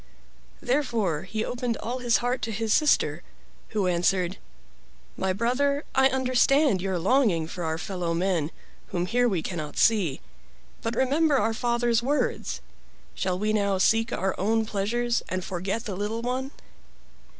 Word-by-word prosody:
Therefore 235 - 0
he 215 +3 -3
opened 245 -2 -2
all 245 +3 -4
his 240 -2 +3
heart 250 +1 0
to 225 - -2
his 220 0 0
sister, 305 -1 +3 0.5
who 210 -3 0
answered: 180 +1 +1 0.8
"My 190 - 0
brother, 265 +8 +1
I 265 0 +5
understand 260 - +3
your 190 -1 -1
longing 190 - +2
for 175 +2 -6
our 160 0 -1
fellow 175 -1 -3
men, 170 -4 0 0.4
whom 175 0 -2
here 245 +5 +2
we 180 -6 -1
cannot 155 -5 -5
see. 190 -11 +3 0.6
But 230 +1 -2
remember 280 +4 +3
our 225 -1 +1
father's 235 0 +1
words. 285 +4 -1 0.5
Shall 185 -1 -1
we 215 +3 0
not 200 -3 +1
seek 225 +1 +3
our 190 +1 0
own 220 +3 +1
pleasures 235 +4 0
and 185 0 -3
forget 190 +6 -3
the 200 - -4
little 210 +4 -3
one?" 255 +2 -2
220 Hz, 150 wpm, -26 LUFS, 185-245 Hz, 0.8 s, I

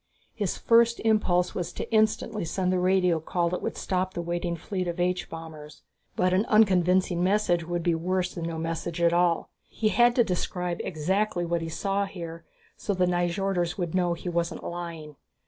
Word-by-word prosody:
His 205 -5 -2
first 235 0 +4
impulse 185 -5 +2
was 175 -1 -3
to - - -5
instantly 215 -1 +1
send 180 +2 -1
the 185 - +1
radio 180 -2 +3
call 170 +2 -1
that 180 - -3
would - - -3
stop 185 0 -2
the 170 - -2
waiting 170 0 -2
fleet 180 +2 -4
of 175 +1 -4
H 180 +1 0
bombers. 155 -2 -10 0.3
But 180 0 +2
an 190 +3 +3
unconvincing 185 -4 +3
message 180 -4 +1
would 175 -1 -2
be 170 - +2
worse 180 +2 -1
than 170 -2 -5
no 165 -1 -3
message 165 +1 -3
at 170 0 +3
all. 175 -1 +2 0.2
He 215 - 0
had 240 +4 +4
to 240 - +5
describe 180 -2 -2
exactly 180 +3 -1
what 170 0 -1
he 165 - -4
saw 195 +4 -1
here 170 -3 -8 0.3
so 200 - -2
the 180 0 +2
Nyjorders 175 0 0
would 175 -4 -3
know 175 -2 +1
he 175 - -9
wasn't 170 -1 -2
lying. 165 -4 -6
180 Hz, 185 wpm, -27 LUFS, 170-190 Hz, 0.3 s, to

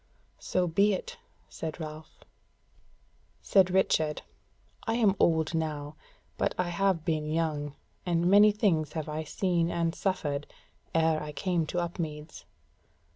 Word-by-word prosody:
"So 185 -1 0
be 200 +5 +3
it!" 185 - -5 0.3
said 160 0 -6
Ralph. 155 0 -9 1.2
Said 190 -2 +4
Richard: 160 -5 +1 0.6
"I 225 - +1
am 215 -5 +3
old 160 -1 +2
now, 155 -2 -3 0.4
but - - 0
I 180 -1 0
have 180 -2 +1
been 155 -2 -1
young, 155 -3 -1 0.3
and 170 -1 0
many 205 +3 +7
things 170 -8 +1
have 155 -2 -3
I 155 +1 -3
seen 170 0 0
and 170 -1 0
suffered, 150 -8 -2 0.5
ere 160 -1 +3
I 150 0 -5
came 170 +1 -1
to 175 - -2
Upmeads. 160 -3 -5
165 Hz, 130 wpm, -29 LUFS, 155-185 Hz, 1.2 s, many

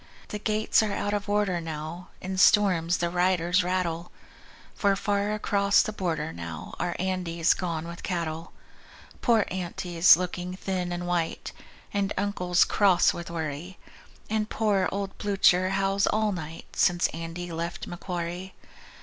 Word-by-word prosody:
The 210 - -4
gates 215 +1 +2
are 215 -1 -1
out 205 0 -1
of 205 0 -2
order 205 -4 +1
now, 160 +2 -6
In 190 +1 -4
storms 180 -5 +4
the 170 0 -1
'riders' 180 0 +2
rattle; 175 -2 -2 0.6
For 200 -1 +2
far 200 +1 0
across 200 -1 +3
the 215 - -4
border 170 - -2
now 85 -2 -7
Our 175 - -1
Andy's 180 -3 +1
gone 170 -3 -3
with 170 0 -8
cattle. 165 -2 -3 0.7
Poor 230 -4 +3
Aunty's 180 -2 +4
looking 180 0 -4
thin 185 -2 -3
and 175 0 -3
white; 175 -2 -2 0.4
And 200 -1 0
Uncle's 180 -3 +2
cross 190 -4 +4
with 170 -1 -7
worry; 165 +2 -5 0.5
And 215 0 -1
poor 205 -4 +1
old 195 0 -3
Blucher 185 -2 +3
howls 195 +1 +1
all 215 0 +1
night 165 -3 -7
Since 175 0 +3
Andy 165 +2 -6
left 170 +1 -4
Macquarie. 175 +1 -5
180 Hz, 140 wpm, -27 LUFS, 170-200 Hz, 0.7 s, storms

